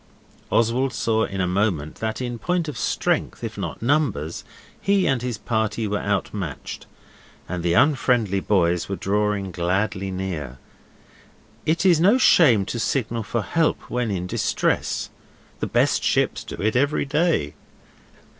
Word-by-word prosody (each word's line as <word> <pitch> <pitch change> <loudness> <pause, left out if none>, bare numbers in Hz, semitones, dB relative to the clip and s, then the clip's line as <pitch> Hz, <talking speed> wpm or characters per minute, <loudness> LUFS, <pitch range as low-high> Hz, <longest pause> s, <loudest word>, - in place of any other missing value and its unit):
Oswald 120 +3 +2
saw 110 -1 +1
in 95 - -5
a - - +2
moment 90 -5 -1
that 110 +2 -3
in 120 -2 -4
point 175 +5 -1
of 150 - -5
strength, 115 - -1
if - - -4
not - - -5
numbers, 115 - 0 0.4
he 200 -1 +2
and 135 -3 +1
his 125 -3 -3
party 110 -1 -1
were 105 0 -1
out 100 -1 -1
matched, 90 -9 -6 0.6
and 90 -1 -3
the 85 0 +1
unfriendly 125 - +3
boys 90 -3 +1
were 100 - -1
drawing 100 -1 -1
gladly 95 +3 -1
near. 90 -9 -4 1.1
It 165 +4 +1
is 175 -4 +5
no 200 +9 +5
shame 125 - +5
to 115 - -4
signal 115 +1 -1
for 115 0 -2
help 165 +6 0
when 125 -2 0
in 90 -3 -2
distress 90 - -1 0.5
the - - -2
best - - +2
ships - - +1
do - - -7
it 110 +3 -1
every 140 +3 +2
day. 150 - +1
110 Hz, 150 wpm, -23 LUFS, 95-135 Hz, 1.1 s, is